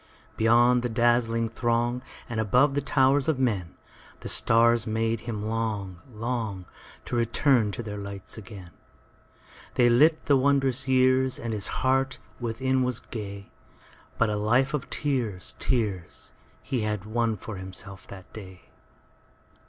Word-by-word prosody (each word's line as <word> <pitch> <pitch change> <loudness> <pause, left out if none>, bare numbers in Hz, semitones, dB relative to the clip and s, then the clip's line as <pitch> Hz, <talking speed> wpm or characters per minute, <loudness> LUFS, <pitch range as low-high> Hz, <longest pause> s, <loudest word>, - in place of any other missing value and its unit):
Beyond 120 +2 +4
the 120 - -2
dazzling 115 0 +2
throngAnd 120 +1 0 0.3
above 120 +5 +2
the 145 - 0
towers 140 +1 +3
of 160 -4 +2
menThe 105 -10 -1 0.5
stars 115 0 +3
made 115 +1 0
him 105 -2 -3
long, 105 -5 -3
long, 110 -5 -4 0.4
To - - -3
return 120 -1 +2
to 120 - -4
their 105 -2 -6
light 100 -1 -6
again. 95 -4 -10 1.0
They 120 -1 +5
lit 155 +7 +4
the 145 - +4
wondrous 135 -1 +2
yearsAnd 130 -2 +2
his 105 -2 0
heart 130 0 0 0.2
within 130 +3 0
was 125 -2 0
gay; 100 -3 -7 0.7
But 115 -2 +2
a 105 - -1
life 120 +6 +2
of 145 -3 -3
tears, 120 -10 -2
tears, 105 -9 -2 0.3
He 130 -4 -2
had 105 -2 -2
won 115 0 0
for 105 +1 -7
himself 95 +1 -7
that 95 -2 -12
day. 95 -4 -11
115 Hz, 130 wpm, -26 LUFS, 105-130 Hz, 1.0 s, They